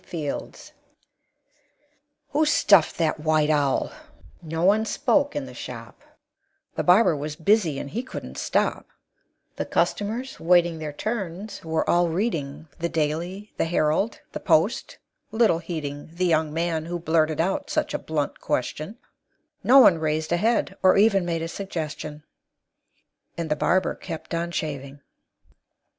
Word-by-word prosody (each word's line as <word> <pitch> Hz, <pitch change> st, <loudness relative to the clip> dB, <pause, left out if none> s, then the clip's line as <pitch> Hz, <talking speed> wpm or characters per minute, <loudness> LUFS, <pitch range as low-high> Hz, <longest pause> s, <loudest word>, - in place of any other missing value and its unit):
FIELDS 155 Hz, -5 st, -6 dB, 1.6 s
"Who 295 Hz, +2 st, +2 dB
stuffed 200 Hz, -, +4 dB
that 160 Hz, -2 st, 0 dB
white 155 Hz, 0 st, +2 dB
owl?" 145 Hz, -3 st, +1 dB, 0.5 s
No 165 Hz, 0 st, -3 dB
one 210 Hz, +3 st, +4 dB
spoke 280 Hz, +4 st, +1 dB
in 290 Hz, -2 st, -2 dB
the -, -, -10 dB
shop, -, -, -9 dB, 0.7 s
The -, -, -1 dB
barber 180 Hz, -1 st, +5 dB
was 150 Hz, +1 st, -4 dB
busy, 170 Hz, -3 st, +2 dB
and 140 Hz, -, -5 dB
he 235 Hz, -, -2 dB
couldn't 260 Hz, -, -8 dB
stop; -, -, 0 dB, 0.7 s
The -, -, -2 dB
customers, 230 Hz, +6 st, -1 dB
waiting 175 Hz, -1 st, +3 dB
their 155 Hz, -1 st, -4 dB
turns, 200 Hz, +2 st, -5 dB
were 160 Hz, -1 st, -1 dB
all 175 Hz, 0 st, +3 dB
reading 160 Hz, -6 st, -2 dB
The 170 Hz, 0 st, -1 dB
"Daily," 170 Hz, +6 st, -2 dB
the -, -, +1 dB
"Herald," 165 Hz, +5 st, 0 dB
the -, -, -5 dB
"Post," -, -, +1 dB, 0.3 s
little 220 Hz, -6 st, +3 dB
heeding 150 Hz, -4 st, -5 dB
The 175 Hz, +2 st, -1 dB
young 160 Hz, -3 st, +2 dB
man 165 Hz, 0 st, -1 dB
who 175 Hz, +1 st, -3 dB
blurted 160 Hz, -2 st, +1 dB
out 185 Hz, +4 st, 0 dB
such -, -, -1 dB
a -, -, -1 dB
blunt -, -, -3 dB
question; -, -, -3 dB, 0.7 s
Not 265 Hz, +1 st, +8 dB
one 170 Hz, -4 st, +6 dB
raised 155 Hz, 0 st, -1 dB
a 175 Hz, -, +3 dB
head, 225 Hz, +6 st, +1 dB
or 185 Hz, 0 st, +5 dB
even 200 Hz, -3 st, +4 dB
made 165 Hz, -1 st, -1 dB
a -, -, -2 dB
suggestion; 155 Hz, -5 st, -5 dB, 1.1 s
And 165 Hz, -2 st, -3 dB
the -, -, +3 dB
barber 185 Hz, +5 st, +1 dB
kept 160 Hz, -, -8 dB
on 170 Hz, +1 st, -1 dB
shaving. 140 Hz, -4 st, -5 dB
170 Hz, 145 wpm, -24 LUFS, 155-200 Hz, 1.6 s, Not